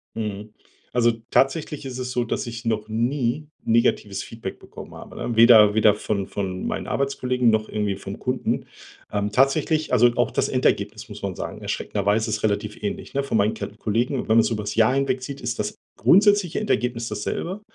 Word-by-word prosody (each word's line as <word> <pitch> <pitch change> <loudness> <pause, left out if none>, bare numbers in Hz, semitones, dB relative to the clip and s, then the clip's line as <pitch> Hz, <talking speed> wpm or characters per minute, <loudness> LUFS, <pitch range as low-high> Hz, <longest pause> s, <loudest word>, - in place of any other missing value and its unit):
Mhm. 105 -1 -5 0.4
Also, 120 -1 +4 0.2
tatsächlich 150 +2 +1
ist 130 -1 -6
es 125 0 -4
so, 125 - 0
dass 120 - -2
ich 115 0 -7
noch 110 -2 -1
nie 120 +5 -1 0.2
negatives 115 -3 +1
Feedback 115 -4 -8
bekommen - - -11
habe, - - -11
ne? 120 - -3
Weder 110 -2 +7
weder 110 -1 +5
von 100 -2 -2
von 95 -2 -4
meinen - - -3
Arbeitskollegen 125 -3 +1
noch 110 0 0
irgendwie 105 -2 -1
vom 100 - -8
Kunden. - - -1 0.5
Ähm, 105 0 -1
tatsächlich 150 +4 +2
also, 120 +1 +5
auch 120 -1 +1
das - - 0
Endergebnis, 115 -2 0
muss 105 -1 -10
man 100 -2 -3
sagen, - - -6
erschreckenderweise 105 +2 -1
ist 105 0 -2
relativ 105 0 -1
ähnlich, 105 - -4
ne? 140 0 0
Von 115 - 0
meinen 105 +2 +2
K - - -4
Kollegen. 120 +5 0
Wenn - - -7
man 110 +1 +5
es 115 - +4
über's 105 -2 -3
Jahr 115 +3 +4
hinwegzieht, 135 0 -2
ist 115 - -3
das 105 0 -2 0.2
grundsätzliche 195 - +4
Endergebnis 120 - -1
dasselbe. 165 - -4
115 Hz, 185 wpm, -23 LUFS, 105-130 Hz, 0.5 s, Weder